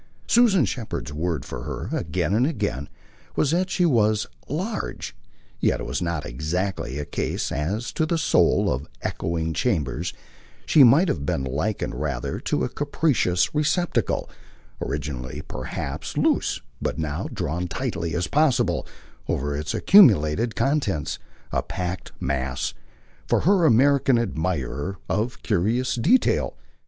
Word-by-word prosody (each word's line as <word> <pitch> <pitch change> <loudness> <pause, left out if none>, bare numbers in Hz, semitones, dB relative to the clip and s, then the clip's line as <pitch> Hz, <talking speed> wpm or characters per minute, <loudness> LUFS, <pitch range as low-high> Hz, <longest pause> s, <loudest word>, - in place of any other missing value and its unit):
Susan 220 - +5
Shepherd's 110 - -4
word 80 +1 -2
for - - -6
her, - - -4
again 85 +2 -1
and 120 +5 +3
again, 70 - -2 0.5
was 145 - +2
that 180 +3 +1
she 180 -1 +2
was 110 -8 +3 0.2
"large"; 190 - -3 0.4
yet - - +2
it - - -4
was - - -3
not 85 -3 -2
exactly 75 +1 -2
a 75 - -3
case, 70 - -2
as 100 +11 -2
to 160 - 0
the 170 - +1
soul, 160 - +3
of 65 +4 -5 0.2
echoing 80 -1 -2
chambers: 75 +2 -1 0.5
she 150 - +6
might 140 +10 +6
have 80 - -1
been 70 - -1
likened 80 +11 -2
rather 70 -5 -3
to - - -1
a - - 0
capacious 140 - +1
receptacle, 155 +4 +1 0.5
originally 70 -3 -4
perhaps 65 +1 -5
loose, - - +1 0.2
but - - -2
now 75 -2 -2
drawn 85 +5 -2
as 90 - -3
tightly 85 -9 -3
as 90 - 0
possible 125 - +2 0.4
over 70 +2 -1
its 75 +1 -3
accumulated 110 - +5
contents 100 - 0 0.3
a - - +1
packed 90 -1 -4
mass, 65 -2 -2 0.5
for - - +2
her 185 -2 +4
American 135 0 +4
admirer, 90 - -2
of 115 +4 -2
curious 115 +6 +1
detail. 230 - +2
90 Hz, 135 wpm, -24 LUFS, -, 0.5 s, she